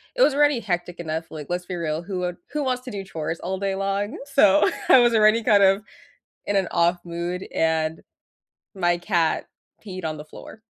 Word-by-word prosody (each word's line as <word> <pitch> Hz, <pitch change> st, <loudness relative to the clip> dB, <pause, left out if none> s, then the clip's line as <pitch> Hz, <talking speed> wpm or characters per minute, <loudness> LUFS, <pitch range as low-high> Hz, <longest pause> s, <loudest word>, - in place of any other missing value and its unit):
it -, -, -1 dB
was 300 Hz, -, +5 dB
already 290 Hz, -3 st, +3 dB
hectic 175 Hz, -3 st, -3 dB
enough, 160 Hz, 0 st, -4 dB
like, 155 Hz, -2 st, -7 dB
let's 180 Hz, 0 st, -2 dB
be 185 Hz, -, -4 dB
real, 160 Hz, -2 st, -2 dB
who 185 Hz, +1 st, -5 dB
would 180 Hz, -1 st, -3 dB, 0.2 s
who 300 Hz, -1 st, -1 dB
wants 255 Hz, -1 st, -1 dB
to 255 Hz, -, -7 dB
do 200 Hz, -1 st, -5 dB
chores 165 Hz, -3 st, -5 dB
all 190 Hz, +1 st, -3 dB
day 195 Hz, -1 st, -1 dB
long? 200 Hz, -, -2 dB
So 210 Hz, -9 st, +4 dB, 0.2 s
I -, -, +9 dB
was 240 Hz, -1 st, +4 dB
already 220 Hz, +1 st, +4 dB
kind 205 Hz, -2 st, +5 dB
of, 195 Hz, +1 st, +4 dB, 0.6 s
in 205 Hz, -, 0 dB
an 190 Hz, -3 st, +1 dB
off-mood, 175 Hz, +1 st, -1 dB
and 160 Hz, 0 st, 0 dB, 0.8 s
my 175 Hz, -2 st, +1 dB
cat 175 Hz, -2 st, 0 dB, 0.4 s
peed 185 Hz, -3 st, -6 dB
on 155 Hz, -1 st, -2 dB
the 150 Hz, -, -8 dB
floor. 220 Hz, -, -12 dB
185 Hz, 195 wpm, -23 LUFS, 170-210 Hz, 0.8 s, I